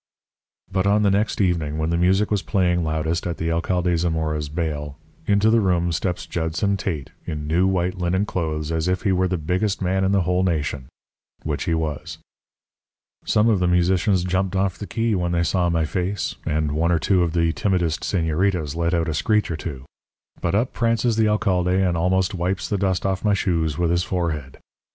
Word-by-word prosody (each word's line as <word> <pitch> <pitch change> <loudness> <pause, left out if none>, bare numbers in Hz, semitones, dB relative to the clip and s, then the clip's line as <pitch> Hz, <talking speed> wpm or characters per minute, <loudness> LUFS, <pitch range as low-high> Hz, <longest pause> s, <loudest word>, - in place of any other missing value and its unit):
"But 95 0 +1
on 105 +1 +3
the 100 - +4
next 100 +2 0
evening, 85 -6 0
when 80 +1 -1
the - - +1
music 95 +5 +2
was 105 -2 +1
playing 90 -4 +1
loudest 80 +2 -1
at 85 - -3
the 80 0 -1
Alcade 90 +1 0
Zamora's 80 -3 -1
baile, 75 -3 -3 0.3
into 105 +2 +4
the 115 0 +4
room 90 -3 +1
steps 90 +2 -2
Judson 85 +4 -1
Tate 80 -9 -4 0.2
in 75 -1 -4
new 85 +5 +2
white 90 0 0
linen 90 +3 +1
clothes 80 -5 -3
as 80 +1 -1
if 90 0 0
he 100 - +2
were 95 0 +2
the 90 0 -1
biggest 90 +6 -1
man 95 +1 0
in 95 - +2
the 100 -1 +3
whole 90 +1 +1
nation, 75 -7 -1 0.6
which 75 -2 -2
he 85 -3 +1
was. 80 -3 -4 1.1
"Some 105 +1 +3
of 110 -4 +3
the 90 - +1
musicians 90 +2 +2
jumped 95 +1 -1
off 95 -1 +1
the 105 - -6
key 115 -1 0
when 90 -3 0
they 85 0 +2
saw 90 0 +1
my 85 -1 +1
face, 90 +1 -2
and 75 -1 0
one 80 +3 +1
or 85 - +3
two 95 +2 +2
of 85 -2 0
the 85 -1 +2
timidest 90 -7 0
señoritas 80 -3 0
let 85 +1 0
out 85 0 0
a 80 - -1
screech 105 +6 +1
or - - -1
two. 70 -4 -7 0.6
But 90 +2 0
up 115 +4 0
prances 115 0 +1
the 110 -1 +3
alcalde 95 -3 +1
and 90 -3 +1
almost 95 +3 +1
wipes 90 +1 -2
the 100 - -1
dust 95 -2 0
off 95 -1 -1
my 105 -2 +3
shoes 80 -6 0
with 85 -1 +1
his 85 0 +2
forehead. 80 -7 -3
90 Hz, 200 wpm, -22 LUFS, 80-95 Hz, 1.1 s, the